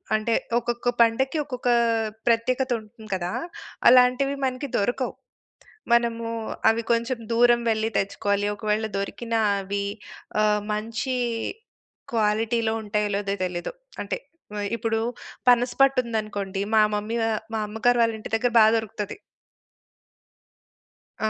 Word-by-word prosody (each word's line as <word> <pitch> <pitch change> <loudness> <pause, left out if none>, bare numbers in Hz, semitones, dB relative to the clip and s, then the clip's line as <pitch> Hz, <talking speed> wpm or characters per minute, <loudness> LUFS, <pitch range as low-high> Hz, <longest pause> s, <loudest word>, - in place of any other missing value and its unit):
అంటే 215 +2 0 0.3
ఒక్కొక్క 240 +1 -2
పండక్కి 250 +6 +2
ఒక్కొక్క 250 -3 -3 0.6
ప్రత్యేకతుంటుంది 230 -2 0
కదా! 180 -1 -3 0.6
అలాంటివి 255 +3 +5
మనకి 260 +2 -2
దొరకవు. 245 +5 -1 0.8
మనము 235 -1 +2 0.4
అవి 225 +1 +2
కొంచెం 235 +2 0
దూరం 240 +1 +5
వెళ్లి 220 0 +1
తెచ్చుకోవాలి. 200 +1 0
ఒకవేళ 215 +1 0
దొరికిన 230 +4 -4 0.3
అవి 200 +1 -3 0.6
ఆహ్, 210 0 +3
మంచి 225 +4 -2 1.0
క్వాలిటీలో 220 +1 +1
ఉంటాయో? 210 0 0
లేదో? 200 -1 -1
తెలీదు. 175 - -5 0.3
అంటే - - -3 0.4
వె 205 - -3
ఇప్పుడు 225 0 -1 0.5
పనస 245 0 +5
పట్టు 275 -1 +5
ఉందనుకోండి 210 -4 -3
మా 220 - +6
మమ్మీ 210 +3 -2
వా 225 - +1 0.3
మా - - 0
అమ్మగారు 225 +3 +1
వాళ్ళ 230 -1 +2
ఇంటి 215 - -8
దగ్గర 245 +2 +2
బా 220 - +8
దొరుకుతది. 210 -2 -4 2.1
ఆ! 220 - +1
225 Hz, 115 wpm, -25 LUFS, 210-245 Hz, 2.1 s, బా